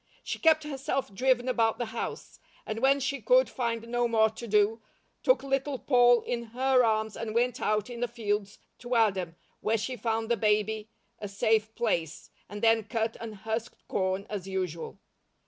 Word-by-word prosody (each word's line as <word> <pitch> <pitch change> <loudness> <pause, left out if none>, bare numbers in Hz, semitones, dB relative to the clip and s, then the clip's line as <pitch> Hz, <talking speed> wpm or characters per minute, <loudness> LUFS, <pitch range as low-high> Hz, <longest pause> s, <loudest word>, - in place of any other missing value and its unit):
She - - -4
kept 315 -1 +4
herself 275 -5 -3
driven 255 +3 +2
about 225 -3 +2
the 240 - -2
house, 235 - -5 0.3
and 215 +1 -4
when 270 +3 +4
she 275 +1 -2
could - - +4
find 230 -3 -3
no 240 0 +1
more 220 -2 +3
to 230 +2 -8
do, 210 +2 +2 0.4
took - - +3
Little 270 0 -1
Poll 245 -2 +4
in 235 -1 -3
her 260 -1 +4
arms 220 -1 +1
and 225 -1 -5
went 245 +1 +1
out 210 -1 +1
in 240 -1 -7
the 245 - 0
fields 210 -4 -3 0.2
to 245 0 -3
Adam, 190 -7 +1 0.2
where 225 +1 +1
she 230 +4 -3
found 225 0 -1
the 235 - +2
baby 215 0 +1 0.3
a 205 - -5
safe 220 +2 +1
place, 170 -9 -2 0.2
and 205 +1 -8
then 225 -2 +4
cut 225 +1 -2
and 225 -2 -7
husked 225 +1 -4
corn 190 +1 -1
as 200 -3 -5
usual. 185 -4 -4
225 Hz, 180 wpm, -28 LUFS, 215-245 Hz, 0.4 s, kept